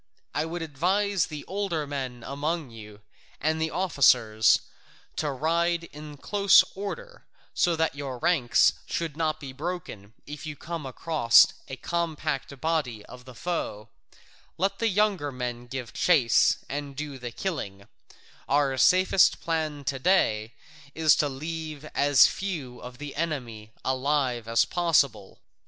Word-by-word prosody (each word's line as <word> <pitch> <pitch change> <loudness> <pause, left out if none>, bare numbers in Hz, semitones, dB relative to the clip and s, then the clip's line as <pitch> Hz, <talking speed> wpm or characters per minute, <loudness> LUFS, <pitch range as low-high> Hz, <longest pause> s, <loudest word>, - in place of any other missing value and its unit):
I - - 0
would 165 +1 -4
advise 185 +5 0
the 150 -3 -8
older 190 -6 -2
men 130 -4 -5
among 150 0 -3
you 105 -2 -12 0.4
and 160 +1 0
the 160 - 0
officers, 125 - +3 0.6
to 150 - -1
ride 170 +5 0
in 150 0 -10
close 200 +5 +5
order, - - -7 0.3
so 175 -1 +2
that 160 -2 0
your 140 -3 -5
ranks 125 -2 +3
should 165 -4 -3
not 155 -1 -1
be 135 -3 -8
broken, 140 - -6
if 150 0 -8
you 150 - -5
come 165 -2 -6
across 130 -3 +4
a 135 - -6
compact 155 -3 -3
body 135 -10 -1
of 125 0 -13
the 130 -2 -12
foe; 115 -12 -4 0.7
let 195 +3 -1
the 230 - +2
younger 195 -7 +1
men 120 -1 -5
give 125 -2 -6
chase, 145 -10 +4
and 140 0 -5
do 145 -1 -6
the 120 -1 -5
killing; 100 - -5 0.6
our 140 -2 +2
safest 185 +6 +4
plan 155 -3 -2
to 135 0 -2
day 115 - +2 0.4
is 160 -2 +5
to 145 - +1
leave 155 +1 -6
as 145 -1 +6
few 155 -11 -3
of 125 0 -10
the 145 0 -8
enemy 125 -10 -4
alive 130 -3 0
as 115 0 +3
possible. 140 - 0
145 Hz, 140 wpm, -26 LUFS, 125-165 Hz, 0.7 s, as